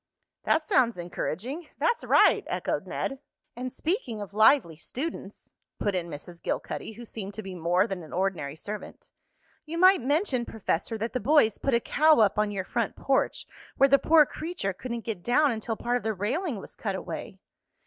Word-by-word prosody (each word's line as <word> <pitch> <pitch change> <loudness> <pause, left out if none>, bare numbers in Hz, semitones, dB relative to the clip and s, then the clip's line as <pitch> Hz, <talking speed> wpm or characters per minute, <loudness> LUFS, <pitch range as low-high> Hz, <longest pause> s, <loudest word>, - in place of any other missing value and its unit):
"That 315 - +3
sounds 245 -8 +2
encouraging." 215 - -4
"That's 475 - +1
right," - - +5
echoed - - -2
Ned. 270 -1 -3 0.4
"And 250 +1 -4
speaking 310 - -2
of 200 -1 -7
lively 215 - +5
students," 240 - -6 0.2
put 205 - -1
in 175 -2 -2
Mrs. 170 +3 -9
Gilcuddy, - - -4
who 240 +2 -9
seemed 205 -3 -7
to 215 - -6
be 190 -1 -7
more 175 +2 +2
than 195 -5 -4
an 160 - -12
ordinary 180 -6 -1
servant, 205 +6 -8 0.5
"you 320 +2 -6
might 370 0 +6
mention, 285 - +1
Professor, 220 -1 -2
that 225 +2 -3
the 255 - 0
boys 250 -3 +3
put 275 -3 +1
a - - +4
cow 310 +6 +4
up 210 -1 +3
on 210 0 +2
your 195 -2 -3
front 235 0 -2
porch 270 -1 0 0.3
where 275 - +5
the 275 0 +6
poor 315 -1 +6
creature 310 - -4
couldn't 235 +3 -6
get 215 -6 -4
down 270 - +3
until 225 0 -3
part 245 +1 0
of - - -6
the 220 -1 -1
railing 260 - -1
was - - -10
cut 200 -3 -3
away." 185 +1 -6
225 Hz, 185 wpm, -27 LUFS, 195-275 Hz, 0.5 s, might